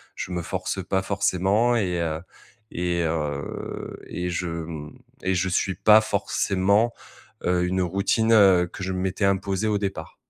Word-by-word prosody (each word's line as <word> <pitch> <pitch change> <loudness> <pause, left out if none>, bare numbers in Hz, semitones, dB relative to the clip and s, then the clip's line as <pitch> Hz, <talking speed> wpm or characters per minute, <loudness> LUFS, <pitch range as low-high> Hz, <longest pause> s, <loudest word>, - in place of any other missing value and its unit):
je 90 - -5
me 90 -1 -2
force 95 +2 -3
pas 95 +1 0
forcément 100 +4 +1
et 90 -5 0
heu, 80 -2 -2 0.5
et 85 0 -1
heu, 75 -3 -4
et 90 0 -3
je 90 +1 -2
mmh 80 -2 -6 0.3
et 95 - +1
je 90 +1 +1
suis 95 +1 0
pas 105 +3 +6
forcément, 100 +1 +1 0.5
heu, 90 0 +2
une, 95 +1 -1
heu, - - +2
routine, 100 +5 +1
heu, 95 -5 +6
que 95 - -8
je 95 - -2
m'étais 95 +2 -2
imposée 100 +1 0
au 105 - +2
départ. 95 -5 -4
95 Hz, 165 wpm, -24 LUFS, 85-100 Hz, 0.5 s, pas